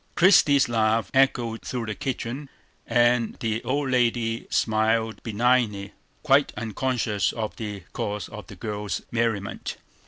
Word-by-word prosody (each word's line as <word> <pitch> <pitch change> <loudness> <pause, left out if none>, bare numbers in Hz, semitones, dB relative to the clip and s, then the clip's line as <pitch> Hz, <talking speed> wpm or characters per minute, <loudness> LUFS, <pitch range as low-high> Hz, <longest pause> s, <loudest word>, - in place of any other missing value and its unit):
Christie's 155 -7 +5
laugh 110 -3 +1
echoed 120 -4 +2
through 125 -3 -4
the 110 - -3
kitchen; 130 +4 -4 0.4
and 120 0 +2
the 110 0 -2
old 140 0 -1
lady 120 -2 +1
smiled 110 0 +1
benignly, 110 -3 +1 0.3
quite 140 -1 +4
unconscious 115 -2 -1
of 110 -2 -4
the 105 -3 -5
cause 105 0 -3
of 105 -4 -9
the - - -10
girl's 105 -2 -4
merriment. 115 -4 -2
115 Hz, 125 wpm, -25 LUFS, 110-125 Hz, 0.4 s, Christie's